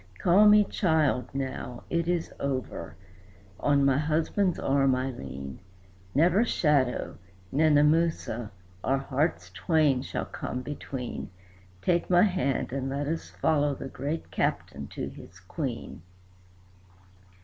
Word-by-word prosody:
"Call 190 - +5
me 210 0 +7
'child' 160 -10 +1
now. 130 -2 -5
It 170 -1 0
is 175 -2 -1
over. 135 -2 -3 0.6
On 140 -1 +3
my 135 0 +3
husband's 160 +4 +1
arm 135 -1 +2
I 130 +1 -1
lean; 70 - -8 0.6
Never 175 +8 +4
shadow, 145 - +1 0.3
Nenemoosa, 150 -5 +2 0.3
our 135 - +2 0.6
twain 155 -6 +2
hearts 130 - -5
shall - - -3
come 125 0 -5
between; 130 -2 -5 0.5
Take 175 -1 +1
my 175 -1 +6
hand, 180 - 0
and 135 -1 -2
let 140 +2 -2
us 160 +3 -3
follow 145 -2 +1
the 135 - -7
great 145 +6 -4
Captain - - -2
to - - -5
his - - -13
Queen." - - -5
145 Hz, 120 wpm, -28 LUFS, 130-165 Hz, 0.6 s, me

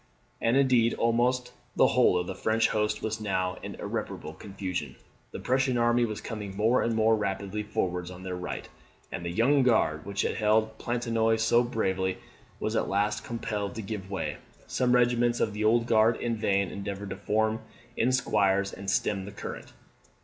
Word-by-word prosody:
And, 115 +3 +3
indeed, 125 -4 +4
almost 125 +2 +1 0.2
the - - +5
whole 125 -7 +4
of 90 - -1
the - - -4
French 110 0 +1
host 105 0 0
was 110 0 -2
now 95 -3 -1
in - - -6
irreparable 75 - -5
confusion. 90 -7 -5 0.3
The - - -7
Prussian 130 -1 +1
army 120 0 +3
was 110 -2 -5
coming 105 -4 -6
more 115 +4 +3
and 115 -1 0
more 110 0 +4
rapidly 100 0 -2
forwards 90 -4 -2
on 90 0 -10
their 90 -1 -4
right; 90 0 -5 0.4
and 85 - -5
the 85 - -3
Young 125 +10 +3
Guard, 110 -11 +2
which 100 0 -2
had - - -1
held 110 0 +2
Planchenoit 115 -2 +1
so 110 +2 +4
bravely, 95 -6 -1 0.4
was - - -2
at - - 0
last 100 +2 0
compelled 105 -3 -3
to 110 - -5
give 95 -2 -5
way. 95 - -3 0.3
Some 125 -1 +1
regiments 120 -1 +3
of 105 - 0
the 105 +1 -3
Old 115 +2 +3
Guard 115 0 +4
in 120 -1 -1
vain 100 -3 +1
endeavoured 100 0 -5
to - - -3
form 110 +1 0 0.3
in 125 +3 +2
squares 100 -6 +2
and 100 0 -5
stem 100 -1 0
the 100 - -8
current. 100 - -7
110 Hz, 180 wpm, -28 LUFS, 100-115 Hz, 0.4 s, the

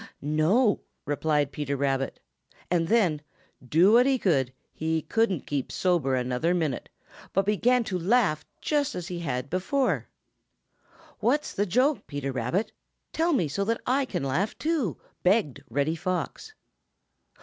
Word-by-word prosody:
"No," 165 - +3 0.3
replied 145 -1 +1
Peter 140 -1 -3
Rabbit. 135 -1 -1 0.5
And 170 -2 +2
then, 180 -9 +2 0.4
do 165 - +4
what 245 +3 +6
he 270 -2 +2
would, 135 -8 +2 0.2
he 160 0 -1
couldn't 225 - 0
keep 140 -3 -3
sober 170 -8 +1
another 125 +7 0
minute, 155 -7 -2 0.4
but 195 0 +2
began 235 +4 +3
to 190 -5 -3
laugh 190 -4 +2 0.2
just 290 -2 0
as 180 +1 -5
he 175 -1 -4
had 130 -5 -3
before. 190 - 0 1.1
"What's 280 +7 +1
the 205 +1 0
joke, 260 - +2
Peter 140 -2 -3
Rabbit? 130 - -1 0.4
Tell 330 +2 +2
me 185 - +2
so 200 +8 -1
that 230 +2 0
I 270 +2 +2
can 245 - -3
laugh 160 +11 -1
too," 300 - -1 0.2
begged 180 - +2
Reddy 145 +6 0
Fox. 185 - -4
175 Hz, 140 wpm, -27 LUFS, 145-230 Hz, 1.1 s, what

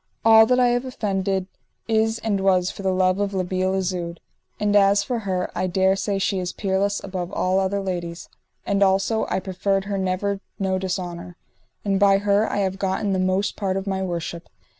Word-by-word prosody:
All 220 0 +8
that 250 +1 +3
I 250 -1 +4
have 245 +1 +1
offended 195 -6 -2 0.4
is 220 0 +2
and 215 -3 -1
was 185 -2 +2
for - - -9
the 190 -1 +1
love 185 +1 +2
of 200 -1 -1
La 185 - +1
Beale 185 +1 -1
Isoud. 180 -2 -3 0.4
And 210 0 +1
as 200 0 +5
for 245 -3 -2
her, 185 -4 -2
I 185 - -1
dare 190 +1 +2
say 195 +1 -1
she 195 0 0
is 180 -1 -3
peerless 200 0 -1
above 185 -2 -4
all 185 +1 +1
other 195 +1 0
ladies, 175 -3 -4 0.4
and 200 0 0
also 195 +3 +2
I - - 0
proffered 195 +1 -1
her 200 -1 -2
never 190 +2 -1 0.2
no 190 -1 0
dishonour; 180 -2 -5 0.5
and 195 -1 +1
by 200 -1 +5
her 205 +1 +1
I - - -2
have 190 0 -2
gotten 195 +1 0
the 190 - 0
most 185 +2 0
part 195 -2 -1
of 195 - -3
my 190 -1 -2
worship. 170 -2 -4
195 Hz, 200 wpm, -23 LUFS, 185-200 Hz, 0.5 s, All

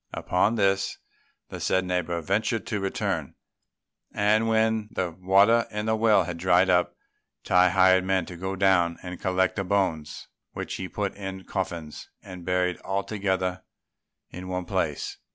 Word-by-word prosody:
Upon 100 +5 +1
this, 95 -2 +1 0.5
the - - -7
said 95 0 +1
neighbour 90 -1 -1
ventured 110 +6 0
to 105 - -2
return; 95 0 -2 0.8
and 105 +2 +2
when 110 -1 +1
the 90 -2 -2
water 100 +6 +3
in 105 0 -4
the 110 0 +1
well 110 -3 +4
had 85 0 -6
dried 90 +1 +4
up, 90 0 +2 0.5
Tai 90 0 +4
hired 95 0 +4
men 95 -2 0
to 90 - -9
go 95 +2 -4
down 90 -3 +2
and 90 -1 -7
collect 95 +1 +1
the 100 - 0
bones, 90 -6 -1 0.3
which - - -5
he 95 -1 -5
put 100 -2 -3
in 95 -1 -7
coffins 85 -6 -5
and 90 -3 -10
buried 90 0 0
all 100 +1 -3
together 95 -3 -2 0.7
in 90 +1 -8
one 90 -1 -3
place. - - -2
95 Hz, 155 wpm, -26 LUFS, 90-100 Hz, 0.8 s, well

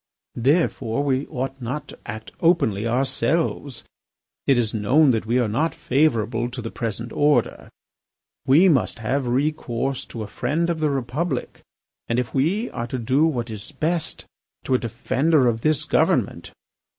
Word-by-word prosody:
Therefore, 135 -3 +1
we 135 0 0
ought 135 -1 -4
not 135 +5 -4
to - - -12
act 110 +1 -7
openly 115 - +2
ourselves. 135 +3 -1 0.6
It 135 - +5
is 115 -3 0
known 130 +8 +4
that 110 -2 -1
we 120 +2 +2
are 120 -3 +2
not 145 +10 0
favourable 120 -4 +1
to 125 +1 -7
the 115 -2 -5
present 115 0 -4
order. 145 -5 +1 0.8
We 155 +8 +6
must 140 -9 +2
have 125 +4 -1
recourse 135 -1 -1
to 115 - -6
a - - -6
friend 170 +10 -1
of 165 - -3
the 155 -1 +1
Republic, 140 +5 -3 0.5
and, 115 - 0
if 125 -1 -2
we 175 - +1
are 120 - -4
to 130 - -3
do 130 +6 +2
what 120 -7 -2
is 110 +7 -9
best, 160 +4 -1 0.4
to - - -1
a 130 - +4
defender 135 +5 +1
of 115 -1 0
this 155 -1 +1
government. - - +1
130 Hz, 160 wpm, -23 LUFS, 115-150 Hz, 0.8 s, We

